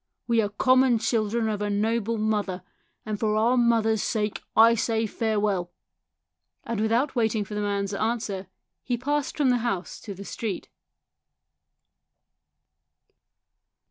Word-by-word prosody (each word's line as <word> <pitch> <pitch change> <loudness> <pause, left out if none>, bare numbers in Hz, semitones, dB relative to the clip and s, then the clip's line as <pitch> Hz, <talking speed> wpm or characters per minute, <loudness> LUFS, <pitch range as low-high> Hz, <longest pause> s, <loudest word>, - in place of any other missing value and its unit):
We 230 -1 +3
are 205 - -1
common 255 +3 +4
children 225 0 0
of 210 -1 -2
a 205 - -1
noble 225 +2 0
mother, 205 -4 -1 0.4
and 215 -1 -3
for 215 -1 +1
our 230 +4 +3
mother's 225 -3 +3
sake 210 -1 -1
I 225 +1 +7
say 225 0 0
farewell." 210 -5 -1 0.9
And 230 -3 -3
without 235 +6 +1
waiting 220 -3 +1
for 210 - -9
the 210 - -2
man's 200 -1 -1
answer 210 -3 -2 0.3
he 245 -2 -2
passed 290 +4 -2
from 280 -4 +3
the 245 - +3
house 225 -6 -3
to 200 - -8
the 200 +2 -9
street. 215 -1 -4
220 Hz, 135 wpm, -26 LUFS, 205-235 Hz, 0.9 s, I